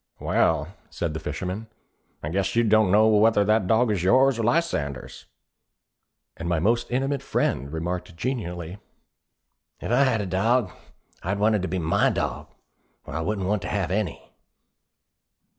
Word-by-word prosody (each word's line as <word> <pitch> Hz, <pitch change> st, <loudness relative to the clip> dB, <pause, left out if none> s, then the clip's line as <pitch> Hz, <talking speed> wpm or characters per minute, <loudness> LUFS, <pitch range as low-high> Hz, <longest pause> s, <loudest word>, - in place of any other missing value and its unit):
'Well,' 80 Hz, 0 st, +1 dB, 0.2 s
said 80 Hz, -2 st, -3 dB
the 80 Hz, -, -4 dB
fisherman, 90 Hz, +9 st, -5 dB, 0.6 s
'I 75 Hz, -, -3 dB
guess 95 Hz, +4 st, -1 dB
you 120 Hz, -, +4 dB
don't 110 Hz, -2 st, +4 dB
know 110 Hz, +2 st, +5 dB
whether 110 Hz, -1 st, +4 dB
that 105 Hz, -2 st, +2 dB
dog 115 Hz, +2 st, +3 dB
is 100 Hz, -5 st, 0 dB
yours 130 Hz, +6 st, +4 dB
or -, -, 0 dB
Lysander's!' 110 Hz, -, -1 dB, 1.1 s
And 85 Hz, +1 st, -5 dB
my 85 Hz, -, +1 dB
most 115 Hz, +8 st, +1 dB
intimate 135 Hz, +2 st, -1 dB
friend 70 Hz, +3 st, -1 dB
remarked 85 Hz, +2 st, -4 dB
genially, 90 Hz, -6 st, -4 dB, 1.0 s
'If -, -, -5 dB
I 130 Hz, +3 st, +4 dB
had 120 Hz, -4 st, +1 dB
a -, -, -3 dB
dog, 100 Hz, +3 st, +1 dB, 0.5 s
I'd 100 Hz, +3 st, -2 dB
want 105 Hz, +2 st, +3 dB
it 105 Hz, -, +1 dB
to 95 Hz, -, -2 dB
be 95 Hz, -, -2 dB
my 80 Hz, -2 st, +2 dB
dog, -, -, -3 dB, 0.6 s
or -, -, -8 dB
I 80 Hz, -, -2 dB
wouldn't 100 Hz, +2 st, -2 dB
want 105 Hz, -1 st, 0 dB
to 90 Hz, -, -5 dB
have 95 Hz, -5 st, -1 dB
any.' 100 Hz, -3 st, -3 dB
100 Hz, 160 wpm, -25 LUFS, 85-115 Hz, 1.1 s, know